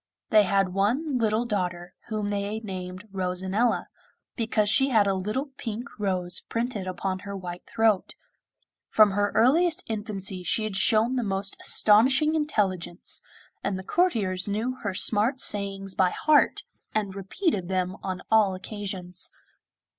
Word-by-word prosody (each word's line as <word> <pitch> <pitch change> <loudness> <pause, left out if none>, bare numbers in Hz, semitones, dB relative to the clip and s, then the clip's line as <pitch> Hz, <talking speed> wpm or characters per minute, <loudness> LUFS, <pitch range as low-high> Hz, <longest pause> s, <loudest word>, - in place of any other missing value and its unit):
They 215 -1 +6
had 195 0 +2
one 250 - +1
little 220 +1 +1
daughter, 180 -5 -3
whom 215 -2 -2
they 205 +1 -2
had 220 - -6
named 185 0 -6
'Rosanella,' 190 +4 0 0.5
because 220 -3 0
she 270 +6 +3
had 220 -5 +4
a 195 - +2
little 215 +9 -3
pink 235 +3 -5
rose 180 -3 -1
printed 230 -5 -3
upon 185 +1 -3
her 200 0 -6
white 180 -1 -8
throat. 220 -4 +1 0.7
From 215 -2 +5
her 205 +1 +1
earliest 320 +8 +3
infancy 205 -4 -3
she 180 +5 0
had 215 -2 -3
shown 225 +5 +3
the 245 - 0
most 195 -1 -1
astonishing 265 +9 +5
intelligence, 200 - -1 0.4
and 195 -1 -1
the 190 - -7
courtiers 200 - +1
knew 220 +5 -1
her 200 -5 -4
smart 220 +6 +3
sayings 195 -4 -1
by 185 -1 +3
heart, 305 +9 +3 0.3
and 205 -3 -1
repeated 195 - -2
them 185 0 -1
on 185 -2 -4
all 210 -4 +4
occasions. 185 -2 -6
205 Hz, 145 wpm, -26 LUFS, 190-225 Hz, 0.7 s, They